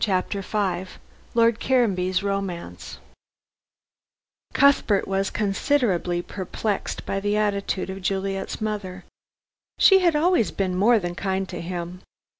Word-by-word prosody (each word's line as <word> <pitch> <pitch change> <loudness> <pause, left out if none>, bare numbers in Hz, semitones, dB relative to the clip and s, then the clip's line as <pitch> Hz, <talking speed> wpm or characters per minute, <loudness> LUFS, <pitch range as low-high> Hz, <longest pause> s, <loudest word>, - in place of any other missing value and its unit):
CHAPTER 195 0 0
V 190 -2 -2 0.5
LORD 230 -1 +4
CARANBY'S 190 -7 +1
ROMANCE 195 -3 -4 1.5
Cuthbert 275 -8 +3
was 195 0 0
considerably 195 -5 0
perplexed 200 +2 -4
by 195 - -2
the 205 +1 0
attitude 200 -2 -1
of 190 +1 -7
Juliet's 195 +1 -2
mother. 200 -4 -4 0.7
She 385 -1 +7
had 345 -4 +3
always 335 - +3
been 190 -2 -2
more 220 +6 +4
than 175 -4 -3
kind 190 +1 -2
to 175 - -5
him. 175 +1 -5
195 Hz, 115 wpm, -24 LUFS, 185-215 Hz, 1.5 s, She